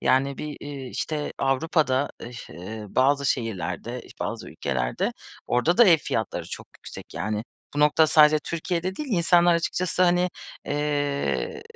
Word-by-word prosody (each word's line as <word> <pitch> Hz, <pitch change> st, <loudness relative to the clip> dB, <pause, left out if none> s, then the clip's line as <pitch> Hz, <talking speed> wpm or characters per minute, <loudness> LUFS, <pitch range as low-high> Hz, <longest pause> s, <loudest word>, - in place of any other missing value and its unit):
Yani 135 Hz, +1 st, +2 dB
bir, 150 Hz, -1 st, -5 dB
iii, 140 Hz, -3 st, -7 dB
işte, 150 Hz, -2 st, -3 dB
Avrupa'da 135 Hz, 0 st, +1 dB
ıh -, -, -6 dB
iş 125 Hz, 0 st, -10 dB
ııı, 105 Hz, +4 st, -8 dB
bazı 140 Hz, +2 st, +3 dB
şehirlerde, 115 Hz, 0 st, -2 dB
iş -, -, -14 dB
bazı -, -, -4 dB
ülkelerde, 60 Hz, -3 st, -1 dB, 0.3 s
orada 155 Hz, +9 st, +2 dB
da 240 Hz, -, +9 dB
ev 170 Hz, -5 st, +7 dB
fiyatları 110 Hz, -7 st, -2 dB
çok -, -, -7 dB
yüksek. -, -, -11 dB
Yani 105 Hz, +6 st, -2 dB, 0.3 s
bu 145 Hz, -, 0 dB
nokta 150 Hz, +2 st, +5 dB
sadece 155 Hz, -1 st, +6 dB
Türkiye'de 175 Hz, +2 st, -2 dB
değil, 300 Hz, -2 st, -5 dB
insanlar 175 Hz, -1 st, +4 dB
açıkçası, 180 Hz, +2 st, 0 dB
hani, 180 Hz, 0 st, +3 dB, 0.4 s
eee, 145 Hz, -, -1 dB
145 Hz, 150 wpm, -25 LUFS, 120-165 Hz, 0.4 s, da